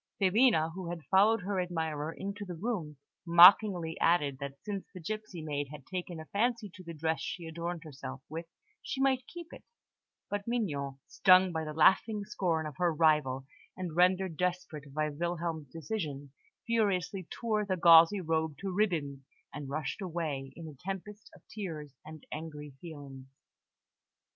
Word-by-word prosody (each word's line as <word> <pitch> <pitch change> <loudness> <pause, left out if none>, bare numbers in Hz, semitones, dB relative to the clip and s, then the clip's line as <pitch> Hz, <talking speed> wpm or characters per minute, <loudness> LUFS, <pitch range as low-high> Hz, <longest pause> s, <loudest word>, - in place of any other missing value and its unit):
Filina, 195 -4 +4
who 180 -1 -6
had 170 -2 -5
followed 210 +3 +5
her 190 0 -1
admirer 160 -3 -2
into 200 +4 -6
the 180 -3 -6
room, 170 -6 -3 0.3
mockingly 175 -1 +7
added 145 -6 +2
that 140 -1 -6
since 200 -2 -4
the 185 - -9
gipsy 215 -1 -5
maid 145 -2 -2
had 145 -2 -10
taken 180 -2 -5
a 160 - -8
fancy 225 +2 -1
to 185 -2 -12
the 170 -1 -8
dress 160 +1 -1
she 175 - -5
had 160 - -7
adorned 170 +1 -4
herself 135 -3 -8
with, 165 +2 -6 0.3
she - - -5
might 265 -2 +2
keep 345 -1 -10
it; - - -11 0.6
but 205 +1 -4
Mignon, 145 - -2
stung 185 -1 +5
by 160 -1 -2
the 155 - -5
laughing 200 +6 +4
scorn 175 -6 -1
of 150 -3 -7
her 175 -1 +2
rival, 150 -5 +2 0.3
and 180 -4 -5
rendered 180 -1 +3
desperate 175 -5 -3
by 155 +2 0
Wilhelm's 165 -1 -3
decision, 150 -5 -5 0.3
furiously 195 -5 0
tore 215 -3 -1
the 190 -2 -1
gauzy 170 +3 +7
robe 160 -2 -1
to 195 -2 -4
ribbons, 165 -9 0 0.3
and 140 -1 -6
rushed 150 +6 -3
away 155 -7 -3
in 165 -1 -8
a 155 - -9
tempest 195 +7 -7
of - - -19
tears 160 -9 -6
and 155 0 -11
angry 150 -2 -7
feelings. 140 -5 -10
170 Hz, 165 wpm, -31 LUFS, 155-195 Hz, 0.6 s, mockingly